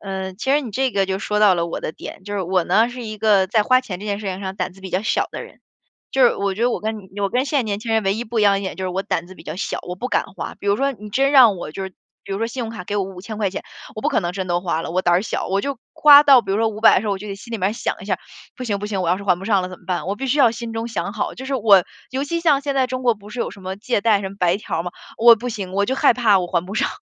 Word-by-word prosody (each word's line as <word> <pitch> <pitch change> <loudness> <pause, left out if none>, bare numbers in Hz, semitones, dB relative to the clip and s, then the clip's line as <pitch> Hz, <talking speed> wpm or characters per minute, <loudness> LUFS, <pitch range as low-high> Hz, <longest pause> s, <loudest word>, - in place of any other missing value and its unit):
呃， 190 -1 -5
其 225 +8 -3
实 290 +2 +4
你 245 - -6
这 260 +5 0
个 195 - +2
就 190 0 -2
说 210 +1 -1
到 205 -3 +6
了 170 -1 -1
我 170 - -5
的 - - -4
点。 185 - -10
就 205 +1 -5
是 200 - -1
我 180 0 +1
呢， 215 +7 +3
是 245 0 -7
一 215 -1 -6
个 205 -3 +4
在 215 +3 +2
花 255 +4 +4
钱 190 -8 -7
这 210 - -7
件 200 -1 -2
事 210 - -6
情 190 0 -3
上 190 -1 -5
胆 - - -3
子 195 - -18
比 190 - -7
较 185 +3 0
小 220 - +1
的 - - -5
人， - - -14 0.5
就 270 - +2
是 240 - +4
我 200 -1 -1
觉 215 - -3
得 245 - +3
我 - - -2
跟 220 +1 -3
你 195 0 -10
我 200 - +1
跟 250 +2 +1
现 285 0 0
在 - - +2
年 205 -3 -3
轻 225 0 -3
人 220 -1 +2
唯 195 +1 +2
一 230 - -4
不 235 0 -3
一 - - +3
样 200 -1 +5
的 195 - 0
一 - - -7
点 190 - -5
就 190 - -4
是 - - -1
我 185 +2 -2
胆 170 - -2
子 185 - -12
比 - - -14
较 - - -6
小， 195 - -3
我 180 - -6
不 250 +6 -4
敢 - - +1
花。 - - -5
比 - - -10
如 200 0 +3
说 275 +3 0
你 210 -4 -11
真 270 +6 +2
让 245 -8 +7
我 175 - -6
就 195 - -5
是 190 - -6 0.3
比 - - -6
如 195 - -2
说 225 - 0
信 245 +2 -5
用 225 - -4
卡 220 -5 -7
给 205 - -3
我 200 - +1
¥5000 195 +3 -8
块 205 -3 0
钱， 185 - -5 0.3
我 215 - -6
不 - - +2
可 - - +1
能 175 -2 -3
真 185 0 -4
都 175 0 0
花 170 -3 -1
了， - - -5
我 185 +2 0
胆 175 0 +3
儿 180 - +3
小， 215 - -3
我 195 +1 +1
就 280 +2 -4
花 290 -1 +8
到 275 -4 +7
比 195 - -6
如 - - +1
说 225 - +2
500 220 +1 +4
的 - - +3
时 - - -5
候， 205 - +1
我 195 - -3
就 210 +2 -8
得 195 - -4
心 230 +4 -11
里 225 - -2
面 185 - +1
儿 - - -4
想 - - -2
一 - - -9
下： - - -1 0.4
“不 255 - -6
行 205 -4 -1
不 205 - -4
行， 195 -3 -2
我 - - -2
要 180 - +2
是 - - -8
还 180 -3 +2
不 190 - -9
上 200 -2 +2
了 180 - -4
怎 185 -1 -10
么 - - -24
办？” 180 -2 -2
我 200 - -2
必 270 - -4
须 270 +3 +1
要 255 -5 +6
心 230 0 -6
中 225 +1 -3
想 225 -3 -3
好， 220 - -3
就 260 - -8
是 275 - -2
我 205 -7 +5 0.3
尤 265 +2 -2
其 335 +3 -2
像 300 -5 +3
现 280 -1 -2
在 265 -1 +2
中 255 0 -4
国 240 -2 +3
不 205 0 -15
是 245 - -8
有 - - -2
什 200 - -13
么 190 +1 -5
借 225 +2 -1
贷、 215 -2 +3
什 195 - -3
么 200 - -12
白 180 -1 +2
条 205 - -4
儿 - - -2
嘛， 175 - -5 0.3
我 235 0 +8
不 245 +3 -5
行， 195 -4 -5
我 200 +1 +1
就 260 - 0
害 255 - +4
怕 220 -5 +4
我 180 - -2
还 175 0 -1
不 195 - -7
上， 265 +6 +1
205 Hz, 395 characters per minute, -21 LUFS, 190-235 Hz, 0.5 s, 花